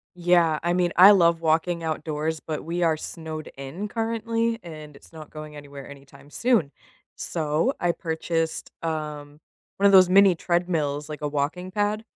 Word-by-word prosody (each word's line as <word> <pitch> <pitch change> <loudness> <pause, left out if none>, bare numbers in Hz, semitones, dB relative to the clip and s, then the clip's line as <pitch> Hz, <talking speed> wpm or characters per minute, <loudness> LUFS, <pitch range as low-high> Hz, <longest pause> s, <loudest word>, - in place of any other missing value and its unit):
Yeah, 170 -3 +2
I 175 0 +1
mean, 175 -1 +1
I 190 +3 +9
love 170 -4 +4
walking 165 +1 0
outdoors, 155 0 -3
but 155 -2 -5
we 170 +2 -3
are 160 -2 +2
snowed 155 -1 -7
in, 140 +10 -6
currently, 230 +1 -2
and 155 -3 -10
it's 140 - -18
not 155 -2 -11
going 155 -1 -10
anywhere 140 -2 -10
anytime 140 0 -15
soon. 230 - +1 0.4
So, 160 - -1
I 175 - +1
purchased, 165 -1 -3
um, 150 -2 -5 0.4
1 200 - +1
of 200 - +7
those 185 -2 +7
mini 195 -1 +6
treadmills, 160 -4 -1
like 150 -1 -7
a 150 - -1
walking 150 +6 -3
pad. 210 +2 -1
165 Hz, 165 wpm, -24 LUFS, 150-180 Hz, 0.4 s, I